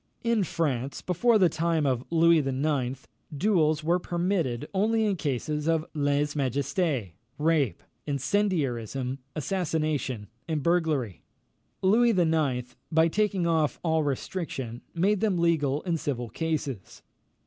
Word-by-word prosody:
In 230 -3 +2
France, 140 -7 -2
before 220 +6 +3
the 190 -3 +5
time 165 -1 0
of 130 -3 0
Louis 165 0 +5
IX., 135 -2 -1 0.3
duels 155 -4 +2
were 170 +3 +2
permitted 170 -8 -1
only 220 +3 +2
in 205 -2 +1
cases 150 0 -2
of 165 -1 +2
lèse 145 0 +1
majesté, 140 - -1 0.3
rape, 150 - +1 0.2
incendiarism, 135 - -1 0.2
assassination, 155 - -1 0.2
and 155 -4 -1
burglary. 155 - 0 0.6
Louis 225 +3 +4
IX., 145 -8 +1 0.2
by 160 +1 +4
taking 200 -1 +1
off 160 -3 +1
all 160 -2 +2
restriction, 135 -4 -3
made 195 +4 +2
them 205 -4 +1
legal 155 -4 +1
in 170 -3 0
civil 125 -6 -3
cases. 145 - -4
155 Hz, 120 wpm, -27 LUFS, 135-175 Hz, 0.6 s, the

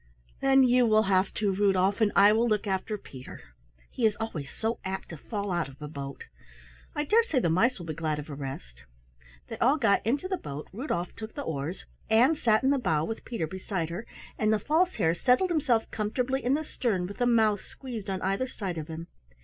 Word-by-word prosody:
"Then 270 0 +5
you 250 -1 +4
will 215 0 +4
have 190 -1 +2
to, 205 -2 +1
Rudolf, 195 +1 +2
and 210 -2 +4
I 205 +1 +7
will 230 +2 +2
look 215 -1 +1
after 195 +2 -2
Peter. 130 -9 -11 0.5
'He - - -5
is 215 -2 +4
always 165 -11 -5
so 225 +1 -3
apt 190 0 -4
to 165 - -7
fall 200 +5 -4
out 170 -5 -1
of 135 - -15
a 150 - -6
boat. 140 -2 -7 0.7
I 295 - 0
dare 445 +10 +5
say 390 - -2
the 170 -10 +2
mice 230 +9 +3
will 175 - -8
be 160 - -4
glad 155 -1 -2
of 150 - -6
a 150 - -7
rest." 65 - -8 0.6
They - - -7
all 265 +6 +4
got 225 -8 +3
into 275 - 0
the 375 0 -1
boat, 145 - -7
Rudolf 190 - -3
took 220 0 -8
the 285 - -4
oars, 160 - -4 0.2
Ann 235 +7 +5
sat 225 -5 +2
in 265 - +4
the 280 - +2
bow 160 -9 +1
with 225 +5 -5
Peter 230 -9 -2
beside 185 -1 -4
her, 180 +7 -6 0.3
and 215 0 +2
the 220 - +4
False 325 - +1
Hare 165 -6 +2
settled 255 - +2
himself 265 -9 +2
comfortably 250 +5 -1
in 255 +3 +2
the 310 +1 -2
stern 205 -11 -1
with 200 +6 -8
a 245 - +4
mouse 220 -4 +3
squeezed 230 -7 -8
on 190 -1 -3
either 195 +7 0
side 190 -9 -4
of 155 - -6
him. 165 0 -6
210 Hz, 220 wpm, -28 LUFS, 170-245 Hz, 0.7 s, I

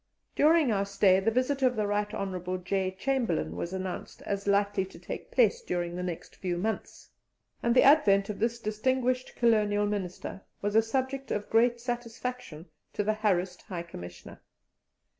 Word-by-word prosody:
During 310 -3 +4
our 200 -2 +1
stay 195 -1 +4
the 200 +3 +2
visit 255 +4 0
of 255 -1 +3
the 215 -1 0
Right 205 0 0
Hon. 185 -1 -3
J. 190 0 0
Chamberlain 190 - -1
was 170 - -4
announced 190 -1 -5
as 200 0 -3
likely 200 -1 +2
to 190 - -11
take - - -7
place 480 -1 +3
during 175 - -3
the 180 - -3
next 180 -2 -6
few 180 -2 -2
months, 220 +5 -4 0.5
and 235 0 +2
the 255 - +7
advent 205 -9 +5
of 210 - -5
this 230 +2 0
distinguished 250 +4 -1
Colonial 210 -3 +3
Minister 195 -2 -4 0.2
was 205 0 -2
a 225 - +7
subject 265 +3 -2
of 205 0 -3
great 235 +1 +4
satisfaction 240 -7 -5 0.3
to 205 - -1
the 215 +1 +1
harassed 190 -4 0
High 180 -5 -6
Commissioner. 85 - -10
205 Hz, 165 wpm, -29 LUFS, 185-240 Hz, 0.5 s, the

